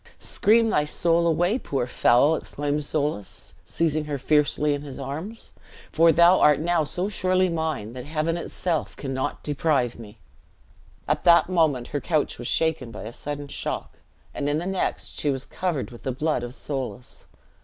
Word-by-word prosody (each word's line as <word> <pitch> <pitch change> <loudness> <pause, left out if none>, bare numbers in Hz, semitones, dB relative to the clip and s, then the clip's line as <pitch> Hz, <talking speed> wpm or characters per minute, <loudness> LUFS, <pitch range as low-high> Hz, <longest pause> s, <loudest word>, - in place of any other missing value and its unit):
"Scream 225 +1 +2
thy 150 - +3
soul 170 +3 +2
away, 175 +8 +2
poor 135 - -2
foul!" 125 +4 +4
exclaimed 145 0 -3
Soulis, 145 -8 -3
seizing 155 -2 0
her 145 -1 -3
fiercely 150 +1 +2
in 145 - -3
his 140 -2 -8
arms; 160 - -6 0.4
"for 165 +1 +5
thou 170 +3 +6
art 150 -1 +5
now 170 0 +1
so 180 +5 -2
surely 185 -2 +1
mine, 160 -10 -3
that 125 -1 -7
Heaven 155 +2 -1
itself 170 -1 -3
cannot 135 -1 -3
deprive 145 -5 0
me!" 110 -1 -11 0.9
At - - 0
that 170 +1 +6
moment 155 -9 +1
her 145 - -3
couch 155 -3 -1
was 120 - -4
shaken 160 -7 +1
by 115 - -8
a 110 - -6
sudden 145 +3 -5
shock, - - -5 0.3
and 145 - -2
in 145 - +1
the 170 - -3
next 190 0 -3
she 150 - 0
was 135 -1 -2
covered 170 -10 -3
with 120 - -12
the 130 - -2
blood 150 +1 -1
of 120 +1 -6
Soulis. 130 -3 -5
150 Hz, 170 wpm, -25 LUFS, 135-170 Hz, 0.9 s, thou